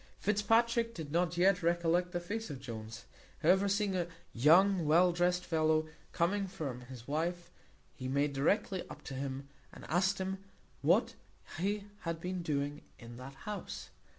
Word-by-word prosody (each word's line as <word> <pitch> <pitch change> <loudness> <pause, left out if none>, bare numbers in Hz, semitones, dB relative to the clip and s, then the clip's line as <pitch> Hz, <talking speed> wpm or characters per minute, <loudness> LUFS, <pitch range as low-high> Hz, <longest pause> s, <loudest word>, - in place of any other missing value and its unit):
Fitzpatrick 230 +3 +2
did 155 -4 -6
not 170 +1 +1
yet 180 +1 +4
recollect 170 +1 +2
the 175 - -1
face 210 +5 -4
of 140 -3 -6
Jones; 115 -3 -7 0.4
however, 190 +5 +5
seeing 200 -1 +1
a 175 -2 0 0.3
young 175 +8 +5
well 175 +4 +6
dressed 180 +1 +1
fellow 155 -1 +2 0.2
coming 195 +4 +1
from 140 -8 -5
his 125 -1 -11
wife, 170 +4 -2 0.4
he 130 - -6
made 140 +2 +1
directly 185 +7 +1
up - - -10
to - - -7
him, 135 +1 -4 0.2
and - - -11
asked 190 +4 +2
him 190 0 -3 0.4
what - - +3 0.5
he 200 +3 0 0.2
had 165 -1 -3
been 180 +1 -3
doing 145 -2 -2 0.2
in 120 0 -10
that 135 +2 -9
house? 210 -1 -6
170 Hz, 155 wpm, -33 LUFS, 145-190 Hz, 0.5 s, well